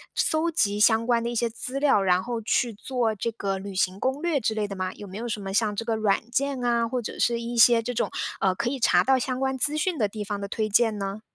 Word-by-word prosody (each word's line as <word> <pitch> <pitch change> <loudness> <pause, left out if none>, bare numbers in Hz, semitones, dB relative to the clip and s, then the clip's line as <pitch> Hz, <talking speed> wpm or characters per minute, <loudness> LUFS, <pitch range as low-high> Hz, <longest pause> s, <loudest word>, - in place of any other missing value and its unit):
搜 315 +2 +1
集 205 -9 +1
相 225 +1 +4
关 235 -1 +2
的 235 - -2
一 - - -4
些 235 0 +1
资 250 +4 -4
料， 275 -8 +3
然 180 -1 +2
后 240 -1 -3
去 235 +2 0
做 230 +1 -2
这 230 +3 -2
个 195 -3 -3
旅 195 +1 -7
行 190 0 0
攻 265 +5 -1
略 335 -4 +1
之 220 -2 -1
类 215 -1 -2
的 200 - -6
吗？ 185 -1 -3
有 205 - -10
没 190 +1 -8
有 235 +2 -4
什 215 -2 -3
么 195 -1 -5
像 210 0 +1
这 230 - -3
个 225 -1 0
软 220 +1 0
件 270 0 -1
啊， 235 -1 +1
或 250 +1 -2
者 220 - -7
是 235 -1 +2
一 235 +1 -5
些 230 0 +6
这 245 +2 -4
种， 240 - -1 0.3
呃， 190 -1 +2
可 235 +4 -1
以 270 +1 -4
查 - - +4
到 265 0 +3
相 255 +1 -3
关 265 0 -1
资 295 +4 +2
讯 345 +2 0
的 215 - +1
地 210 +1 -6
方 205 -1 -4
的 200 - -4
推 215 +1 -2
荐 220 0 +3
呢？ 195 +1 -4
230 Hz, 300 characters per minute, -25 LUFS, 205-250 Hz, 0.3 s, 些